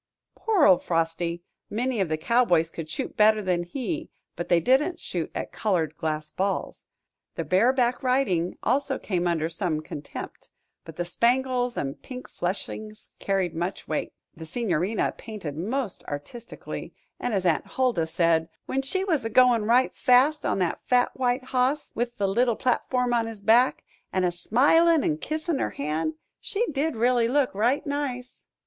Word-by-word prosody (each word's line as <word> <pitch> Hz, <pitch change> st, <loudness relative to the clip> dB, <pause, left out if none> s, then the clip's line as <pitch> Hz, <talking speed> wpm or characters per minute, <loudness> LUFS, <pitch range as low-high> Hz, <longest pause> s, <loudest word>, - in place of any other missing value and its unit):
Poor 415 Hz, -8 st, +2 dB
old 185 Hz, -2 st, +6 dB
Frosty! 170 Hz, +1 st, -1 dB, 0.3 s
Many 235 Hz, +2 st, -1 dB
of 185 Hz, -, 0 dB
the 155 Hz, -, 0 dB
cowboys 175 Hz, -5 st, +2 dB
could 160 Hz, -2 st, -7 dB
shoot 265 Hz, -, -4 dB
better 215 Hz, 0 st, +5 dB
than 180 Hz, -4 st, 0 dB
he; 280 Hz, -, -4 dB, 0.3 s
but 175 Hz, -, -5 dB
they 175 Hz, -, +5 dB
didn't 280 Hz, -, +2 dB
shoot 170 Hz, -3 st, -3 dB
at -, -, -4 dB
colored 175 Hz, -4 st, 0 dB
glass 155 Hz, 0 st, -3 dB
balls. 195 Hz, +1 st, -3 dB, 0.5 s
The -, -, -2 dB
bareback 245 Hz, +6 st, +2 dB
riding 250 Hz, -10 st, +1 dB
also 270 Hz, +3 st, +1 dB
came 180 Hz, -3 st, -1 dB
under 160 Hz, -2 st, +1 dB
some 165 Hz, -1 st, -2 dB
contempt; 150 Hz, -1 st, -8 dB, 0.4 s
but 165 Hz, -, -10 dB
the 175 Hz, -, -2 dB
spangles 245 Hz, +5 st, +1 dB
and 135 Hz, -1 st, -3 dB
pink 255 Hz, -1 st, -8 dB
fleshings 215 Hz, +4 st, -5 dB
carried 190 Hz, -3 st, 0 dB
much 175 Hz, +4 st, -4 dB
weight, 155 Hz, -, -2 dB, 0.2 s
the 160 Hz, 0 st, -9 dB
Signorina 195 Hz, 0 st, 0 dB
painted 200 Hz, -10 st, -6 dB
most 215 Hz, -, -3 dB
artistically, 145 Hz, +12 st, -7 dB, 0.2 s
and, 245 Hz, -, -2 dB
as 190 Hz, -2 st, -1 dB
Aunt 160 Hz, -4 st, +1 dB
Huldah 245 Hz, -11 st, 0 dB
said, 165 Hz, -1 st, +2 dB, 0.2 s
"When 270 Hz, -, -1 dB
she 375 Hz, +8 st, -1 dB
was 330 Hz, -, 0 dB
a 225 Hz, -, -2 dB
goin' 240 Hz, -2 st, +4 dB
right 245 Hz, +4 st, +3 dB
fast 270 Hz, +5 st, +3 dB
on -, -, 0 dB
that 180 Hz, -3 st, -1 dB
fat 250 Hz, 0 st, +2 dB
white 250 Hz, 0 st, 0 dB
hoss, 255 Hz, +3 st, 0 dB
with 240 Hz, +1 st, -3 dB
the 200 Hz, -, +1 dB
little 235 Hz, +4 st, +2 dB
platform 250 Hz, 0 st, 0 dB
on 230 Hz, -1 st, +1 dB
his 225 Hz, -3 st, -8 dB
back, 235 Hz, +5 st, +4 dB, 0.3 s
an' 185 Hz, -, 0 dB
a 180 Hz, -, +2 dB
smilin' 290 Hz, -, +4 dB
an' 155 Hz, 0 st, 0 dB
kissin' 310 Hz, -, -2 dB
her -, -, 0 dB
hand, 155 Hz, -, -2 dB, 0.2 s
she 450 Hz, +3 st, -1 dB
did 295 Hz, +1 st, -1 dB
really 240 Hz, +1 st, +3 dB
look 270 Hz, +1 st, +1 dB
right 235 Hz, +8 st, +1 dB
nice." 280 Hz, -4 st, -4 dB
225 Hz, 165 wpm, -26 LUFS, 175-255 Hz, 0.5 s, old